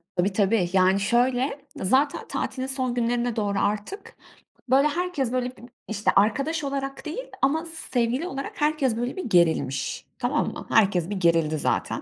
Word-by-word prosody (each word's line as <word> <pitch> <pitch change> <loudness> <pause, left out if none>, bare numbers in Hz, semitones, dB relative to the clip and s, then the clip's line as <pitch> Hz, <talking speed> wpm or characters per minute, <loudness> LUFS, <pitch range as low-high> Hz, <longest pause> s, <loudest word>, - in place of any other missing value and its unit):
Tabii, 190 +3 +1
tabii. 195 -2 +2
Yani 190 +1 +4
şöyle 245 +6 +1
zaten 265 +9 +1
tatilin 260 0 -3
son 260 -2 -1
günlerine 240 0 0
doğru 205 -3 0
artık 210 - -3 0.5
böyle 275 +3 +5
herkes 300 -6 -1
böyle 250 -1 -1
b - - -15 0.3
işte 210 -1 0
arkadaş 275 +10 +2
olarak 275 -1 -4
değil 360 +12 -6
ama 315 +5 +2
sevgili 265 -3 -1
olarak 275 -2 -6
herkes 295 -6 +1
böyle 245 +2 -2
bir 375 - -5
gerilmiş 160 - +1
tamam - - 0
mı? - - -8
Herkes 190 -4 +3
bir 205 - -2
gerildi 165 -4 +2
zaten. - - -1
245 Hz, 155 wpm, -25 LUFS, 200-275 Hz, 0.5 s, böyle